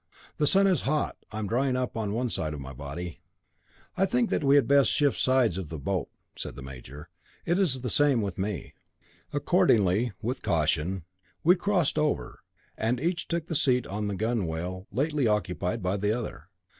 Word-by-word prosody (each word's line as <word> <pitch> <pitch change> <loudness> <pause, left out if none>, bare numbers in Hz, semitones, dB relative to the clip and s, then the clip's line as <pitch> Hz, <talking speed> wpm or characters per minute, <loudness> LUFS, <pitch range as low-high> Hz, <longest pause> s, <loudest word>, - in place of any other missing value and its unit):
"The 150 - +2
sun 195 +5 +5
is 185 -7 +3
hot; 150 +2 0 0.2
I 110 - -6
am 110 - -2
drying 125 +4 +1
up 125 -1 -2
on 110 -3 -2
one 120 +2 -1
side 75 -1 -2
of - - -7
my 70 0 -8
body." 80 +6 -6 0.8
"I 190 +1 +2
think 245 0 +1
that - - +1
we 140 0 +5
had 140 - +4
best 140 -1 +5
shift 145 -2 +2
sides 125 -8 +3
of 90 -6 -6
the 80 - -5
boat," 85 +2 -2 0.3
said - - -6
the 70 - -9
major. 65 +3 -10 0.4
"It 175 +2 +1
is 140 -10 +3
the 125 - -3
same 145 -4 +4
with 95 -3 -4
me." 100 -1 -3 0.6
Accordingly, 120 - +3
with 120 +4 -3
caution, 80 +3 0 0.4
we 175 +3 +6
crossed 180 -4 +1
over, 150 -1 -1 0.4
and 115 +3 0
each 170 +4 -1
took 170 -2 -2
the 170 - -4
seat 130 -6 +2
on 105 +2 -3
the 100 - -2
gunwale 95 -4 -2
lately 140 +3 +1
occupied 95 -4 -1
by 90 +2 0
the 105 +3 +1
other. 120 - -7
115 Hz, 190 wpm, -28 LUFS, 90-145 Hz, 0.8 s, we